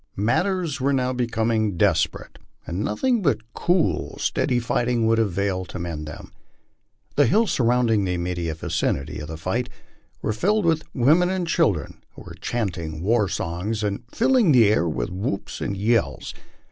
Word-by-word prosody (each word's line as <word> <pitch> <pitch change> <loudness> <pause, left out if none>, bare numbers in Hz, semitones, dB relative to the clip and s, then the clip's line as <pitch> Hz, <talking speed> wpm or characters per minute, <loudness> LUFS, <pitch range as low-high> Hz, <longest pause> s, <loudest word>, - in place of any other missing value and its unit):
Matters 160 - 0
were 140 +2 +2
now 130 -1 +1
becoming 115 -5 0
desperate, 80 -1 0 0.3
and 85 - -4
nothing 220 - 0
but 115 - -1
cool, 175 -1 0
steady 125 - 0
fight 120 0 0
ing 120 -2 +1
would 115 0 +3
avail 100 -2 0
to 90 - -8
mend 80 -4 -5
them. 75 - -9 0.9
The 145 -3 +5
hills 215 - +3
surrounding 120 -3 +2
the 90 -1 -1
immediate 85 -2 -3
vicinity 75 -2 -2
of 75 - -6
the 80 - -6
figkt 110 +9 -2 0.6
were 110 - 0
filled 205 - +1
with 160 -1 +1
women 155 +8 +4
and 185 -1 -1
children, 140 - 0
who - - -11
were - - -10
chanting 85 -9 -3
war 105 -1 +2
songs 95 +8 -3
and 100 -1 -2
filling 240 -6 +3
the 115 -5 +6
air 85 -5 +2
with 65 -3 -3
whoops 100 +2 -4
and 100 - -2
yells. 115 +4 0
110 Hz, 160 wpm, -23 LUFS, 90-130 Hz, 0.9 s, the